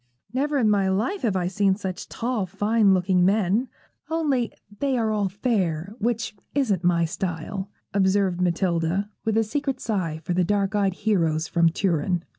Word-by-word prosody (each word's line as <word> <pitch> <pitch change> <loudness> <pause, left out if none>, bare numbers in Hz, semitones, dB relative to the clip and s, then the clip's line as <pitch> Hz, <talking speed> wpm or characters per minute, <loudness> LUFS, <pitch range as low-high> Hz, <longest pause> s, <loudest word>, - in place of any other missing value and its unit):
'Never 285 +3 0
in 240 -5 +3
my 200 -2 +3
life 225 - 0
have 215 -5 0
I 180 -1 0
seen 195 +1 +2
such 190 -3 -5
tall, 230 -5 -2
fine 205 +2 +2
looking 185 -1 +3
men, 205 +5 +2 0.4
only 290 -7 0 0.3
they 275 -2 +1
are 225 -2 +1
all 205 -2 0
fair, 190 -4 -1
which 230 0 -1 0.2
isn't 215 - +1
my 170 -1 +3
style,' 185 +3 -4 0.2
observed 190 -2 +2
Matilda, 175 +2 0
with 220 0 +1
a 225 - +4
secret 275 +5 -2
sigh 175 -8 -2
for 180 - -2
the 180 +1 +2
dark 200 +2 0
eyed 200 -3 +1
heroes 170 -7 +1
from 170 -1 +3
Turin. 175 0 0
195 Hz, 165 wpm, -24 LUFS, 180-220 Hz, 0.4 s, a